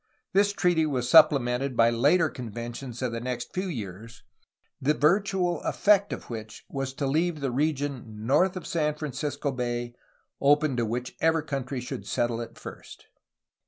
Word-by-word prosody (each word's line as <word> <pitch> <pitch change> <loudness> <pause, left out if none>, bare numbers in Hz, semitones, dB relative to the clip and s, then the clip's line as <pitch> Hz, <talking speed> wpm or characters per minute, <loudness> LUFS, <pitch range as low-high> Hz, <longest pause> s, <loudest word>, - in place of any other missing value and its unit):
This 200 +1 +4
treaty 175 -5 +2
was 125 -4 -1
supple 155 +1 +8
mented 125 +1 -2
by 115 0 +5
later 145 +9 +3
conventions 120 0 -6
of 125 - 0
the 115 - -3
next 125 -1 -4
few 185 +1 -2
years, 115 - -7 0.6
the 150 +3 +2
virtual 185 +2 +2
effect 205 -1 +3
of - - -6
which 110 -2 -8
was 135 -1 -3
to 140 - -2
leave 160 +4 +1
the 135 -3 -2
region 135 -6 -2
north 180 +9 +3
of 180 - -7
San 150 -3 0
Francisco 145 -1 -3
Bay 120 -1 -3 0.5
open 145 0 +3
to 120 -2 0
whichever 125 +7 0
country 135 -3 -3
should 125 +1 -6
settle 120 -1 0
it 115 0 -9
first. - - -11
135 Hz, 160 wpm, -27 LUFS, 120-155 Hz, 0.6 s, supple